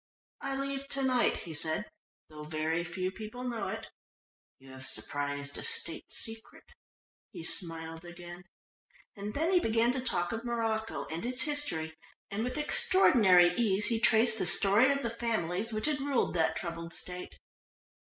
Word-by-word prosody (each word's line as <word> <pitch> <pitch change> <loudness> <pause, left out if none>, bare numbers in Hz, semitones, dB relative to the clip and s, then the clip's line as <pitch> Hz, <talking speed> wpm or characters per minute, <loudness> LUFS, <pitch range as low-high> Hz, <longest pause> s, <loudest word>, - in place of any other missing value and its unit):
"I 275 0 -3
leave 275 0 -3
to 275 -1 +1
night," 255 -2 +2
he 165 - -7
said, 160 +6 -1 0.4
"though 150 -1 -10
very 160 +2 -1
few 185 +1 -3
people 220 +5 -8
know 240 -2 -3
it. - - -5 0.7
You 135 0 -15
have 130 0 -10
surprised 145 0 -2
a - - -5
State 460 0 -4
secret," 225 0 -5 0.7
he - - -9
smiled 165 -1 -3
again. 175 +1 -10 0.7
And 205 0 -6
then 325 +5 +1
he 360 - +6
began 230 -4 +2
to 255 0 -1
talk 175 -8 +1
of 225 0 -4
Morocco 225 -2 -2
and 165 +1 -4
its 250 +1 +2
history, 290 - -1 0.4
and 205 +3 -2
with 250 +3 -3
extraordinary 215 - +5
ease 210 -1 +2
he 230 -2 +1
traced 220 0 +4
the 180 - +1
story 210 +9 +5
of 275 0 -1
the 235 - -1
families 225 -3 -1
which 215 0 -2
had 300 -2 +1
ruled 275 -2 0
that 160 -2 +1
troubled 170 0 -5
State. 180 0 -6
215 Hz, 165 wpm, -31 LUFS, 170-250 Hz, 0.7 s, he